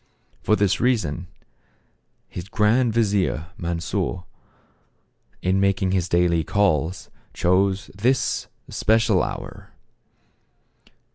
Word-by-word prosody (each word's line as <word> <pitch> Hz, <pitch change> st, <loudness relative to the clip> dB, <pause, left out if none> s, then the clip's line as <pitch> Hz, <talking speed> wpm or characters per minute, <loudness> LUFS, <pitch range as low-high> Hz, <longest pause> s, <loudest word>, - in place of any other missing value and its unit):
For 105 Hz, -, +3 dB
this 100 Hz, -2 st, +1 dB
reason, 90 Hz, -, 0 dB, 1.0 s
his 90 Hz, +3 st, -8 dB
grand 110 Hz, +4 st, +2 dB
vizier, 100 Hz, -, 0 dB
Mansor, 90 Hz, 0 st, -3 dB, 1.2 s
in 95 Hz, +1 st, +2 dB
making 95 Hz, -1 st, +1 dB
his 95 Hz, -1 st, 0 dB
daily 85 Hz, -2 st, +2 dB
calls 90 Hz, -2 st, 0 dB, 0.2 s
chose 95 Hz, +2 st, +1 dB
this 125 Hz, +6 st, 0 dB, 0.2 s
especial 110 Hz, -3 st, +2 dB
hour. -, -, -6 dB
95 Hz, 85 wpm, -23 LUFS, 90-105 Hz, 1.2 s, For